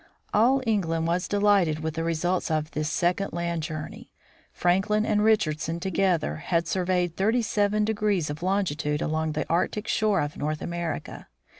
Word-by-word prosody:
All 255 +5 +4
England 165 -7 0
was 175 +2 0
delighted 200 -6 +2
with 160 0 -2
the 165 +1 -3
results 175 +3 0
of 155 0 -1
this 155 0 -2
second 180 +4 0
land 170 -1 -2
journey. 155 -1 -6 0.4
Franklin 200 +5 +1
and 210 -1 +2
Richardson 165 -7 +1
together 180 - 0
had 165 - -1
surveyed 180 -1 0
37 210 0 +1 0.5
of 150 +2 -7
longitude 170 -6 0
along 155 0 -1
the 155 - -2
Arctic 190 +6 0
shore 210 -4 +2
of 145 0 -4
North 150 +1 -2
America. 170 -2 -5
175 Hz, 145 wpm, -26 LUFS, 155-200 Hz, 0.5 s, All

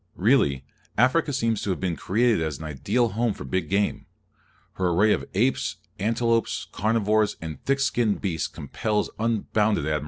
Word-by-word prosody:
Really, 95 - +2 0.3
Africa 130 +7 +3
seems 115 -5 0
to - - -3
have 95 - -1
been 90 -3 -1
created 115 +2 +1
as 80 -3 -2
an 80 - -9
ideal 100 - 0
home 115 0 0
for - - -8
big 80 +4 -2
game. 100 +1 0 0.7
Her 95 -1 0
array 100 +5 +4
of - - -2
apes, 125 +7 +1 0.2
antelopes, 115 +2 0
carnivores, 110 0 +1
and 80 -4 -7
thick 135 0 +2
skinned 120 -6 +1
beasts 90 -6 -1
compels 105 +9 -2
unbounded 110 -4 +1
admiration. 75 0 0
105 Hz, 160 wpm, -25 LUFS, 90-115 Hz, 0.7 s, array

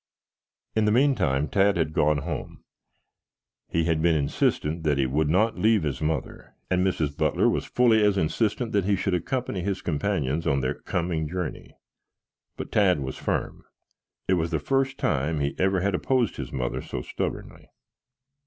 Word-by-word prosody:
In 110 -1 +2
the 105 - +3
meantime, 105 - +2
Tad 100 +1 +2
had 80 -2 0
gone 75 -2 +2
home. 80 -5 -6 1.1
He 85 - +1
had 80 -1 +1
been 85 0 +3
insistent 75 +2 0
that 75 -3 +1
he 70 - +2
would 75 +4 0
not 110 +8 +2
leave 110 -3 +3
his 75 -1 -3
mother, 80 +1 -3 0.2
and 90 0 +2
Mrs. 80 -6 0
Butler - - +2
was - - 0
fully 115 -3 +3
as 105 -1 +3
insistent 110 +7 0
that 100 -3 +1
he 100 0 +2
should 95 0 -1
accompany 105 +2 -2
his 95 +1 -3
companions 80 -2 -1
on 70 -1 +2
their 65 - 0
coming 85 -3 -2
journey. 90 -2 -5 0.8
But - - -6
Tad 95 -7 +3
was 65 -1 -5
firm. - - -3 0.6
It 95 - +3
was 80 - -2
the 80 - 0
first 135 - 0
time 75 +4 0
he 70 0 -1
ever 95 -1 +2
had 100 +1 0
opposed 120 +2 0
his - - -6
mother 60 -3 -2
so 60 - -5
stubbornly. - - -5
85 Hz, 170 wpm, -26 LUFS, 75-100 Hz, 1.1 s, the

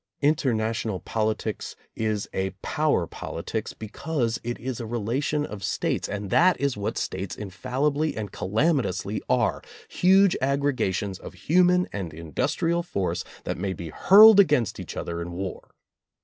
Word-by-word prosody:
Interna 130 -7 +2
tional 110 -4 -4
politics 110 -1 -2 0.2
is 110 -2 -1
a 95 0 -1
"power 150 - +1
politics" - - -5
because 115 +2 -3
it 120 +1 -3
is 130 -1 -4
a 115 - -4
relation 120 +7 -1
of 105 -6 -8
States 95 - -1
and 100 -1 -4
that 180 +2 +4
is 140 -2 0
what 105 0 -3
States 95 0 -3
infal 105 +7 -4
libly 155 0 -1
and 105 -3 -4
calamitously 110 - 0
are, 125 -2 +1 0.3
huge 190 +1 +4
aggregations 130 -9 0
of - - -10
human 180 - +3
and 90 -6 -5
industrial 145 - -1
force 100 - -2 0.2
that - - -4
may 95 0 -2
be 85 -3 -7
hurled 205 - +8
against 145 - +3
each - - -7
other 85 0 -4
in 85 +1 -6
war. 95 +1 -6
115 Hz, 150 wpm, -25 LUFS, 100-150 Hz, 0.3 s, hurled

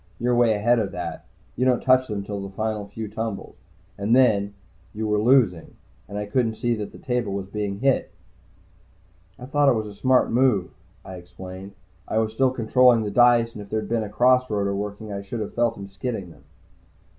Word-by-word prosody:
You're 125 +1 +1
way 120 -2 +3
ahead 120 +3 +2
of 105 -3 -2
that 85 -2 -6 0.3
you 125 - -1
don't 125 -2 +3
touch 130 0 +4
them 105 -2 -4
till 100 0 -5
the 100 - -6
final 105 +1 -3
few 110 +2 -6
tumbles. 110 -1 -5 0.4
And 105 +4 +2
then, 100 -6 +3 0.4
you 110 0 -2
were 105 0 +1
losing, 110 -7 +2 0.3
and 100 - -6
I 105 - -3
couldn't 110 +1 0
see 120 0 0
that 105 -3 -5
the - - -13
table 125 -5 -2
was 100 -1 -3
being 100 0 -4
hit." 135 -1 +2 1.3
"I 125 - -9
thought 145 +1 +3
it 130 - +3
was 110 -1 -2
the 105 - -8
smart 130 +5 +2
move." 120 -6 +2 0.3
I 95 - -8
explained. 95 +2 -10 0.3
"I - - -2
was 110 -1 0
still 130 +3 +3
controlling 125 -1 +3
the 105 - -3
dice, 120 +1 +4
and 105 - -8
if 100 - -11
there'd 110 +1 -3
been 115 -1 0
a 105 - -4
cross 125 +3 +3
roader 100 -4 -1
working, 105 +1 -5
I 100 - -4
should 100 +4 -6
have 105 - -5
felt 115 -1 0
him 100 -1 -8
skidding 95 -2 -5
them." - - -19
110 Hz, 205 wpm, -24 LUFS, 100-120 Hz, 1.3 s, touch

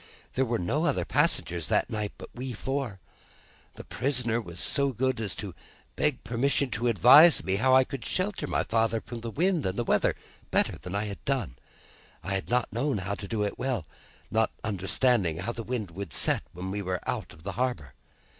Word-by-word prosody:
There 130 - +1
were 120 -1 0
no 90 -3 0
other - - 0
passengers 85 -2 +1
that - - +1
night, 105 -2 -3
but - - -10
we 125 +1 -5
four. 130 -3 -3 0.8
The - - -9
prisoner 120 -3 0
was 85 -5 -9
so 140 +6 +2
good 130 0 0
as 105 -4 -2
to - - -6 0.4
beg - - 0
permission 130 +2 0
to 120 0 -1
advise 140 - +7
me 95 +1 0
how 130 +4 +4
I 130 - +7
could 135 -2 -7
shelter 195 +2 -1
my - - 0
father 115 0 +1
from 120 +1 -8
the 115 - -4
wind 170 - +1
and 100 +6 -2
weather, - - +2 0.3
better - - +2
than 90 +2 -6
I 100 - 0
had 100 -2 -6
done. 130 - -1 0.7
I 100 - -2
had 95 - -2
not 125 -3 +1
known 130 +2 0
how 95 +1 -2
to 100 0 -6
do 110 -1 -1
it 105 - -3
well, 125 -10 -1 0.5
not 110 0 +3
understanding 100 -2 +1
how 95 +7 -2
the 115 - -6
wind 115 -5 -4
would 95 -3 -6
set - - +3
when 90 +2 -6
we 105 +1 -2
were 90 -2 -3
out - - -2
of 80 0 -16
the 100 - -3
harbour. 105 - -2
115 Hz, 200 wpm, -28 LUFS, 95-130 Hz, 0.8 s, advise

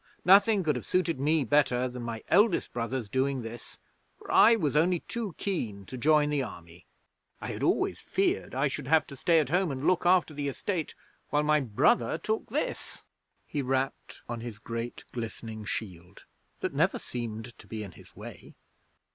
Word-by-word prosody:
Nothing 200 +2 +6
could 150 -4 +1
have 125 - -5
suited 175 -5 +1
me 150 +2 +2
better 130 -1 +2
than 125 0 -7
my 115 -2 -5
eldest 210 -2 +3
brother's 120 0 -3
doing 130 +2 0
this, 115 +1 -9 0.4
for - - -9
I 230 +2 +7
was 150 - -1
only 170 +3 +3
too 225 -7 -5
keen 110 - -3
to 130 - -8
join 150 +3 +3
the 145 -2 +1
Army. 85 -7 -9 0.5
I - - -6
had - - -6
always - - +1
feared 95 +6 -1
I 135 +3 +2
should 130 - -5
have 160 +2 +4
to 140 - -10
stay 165 +5 +3
at 145 -5 0
home 180 +2 +2
and 135 +1 -4
look 185 -1 +3
after 175 -3 +3
the 145 -1 -3
estate 165 +4 -3 0.3
while 150 0 +2
my 150 0 +3
brother 135 - +2
took 220 0 -3
this.' 285 +7 -3 0.4
He 145 - -3
rapped 135 +1 -2
on 120 -1 -5
his 115 -3 -7
great 115 +1 -5
glistening 110 -2 -6
shield 90 -3 -6 0.4
that - - -2
never - - +2
seemed 115 -1 -6
to - - -15
be 110 -1 -5
in 100 - -8
his - - -17
way. - - -11
135 Hz, 180 wpm, -29 LUFS, 115-160 Hz, 0.5 s, I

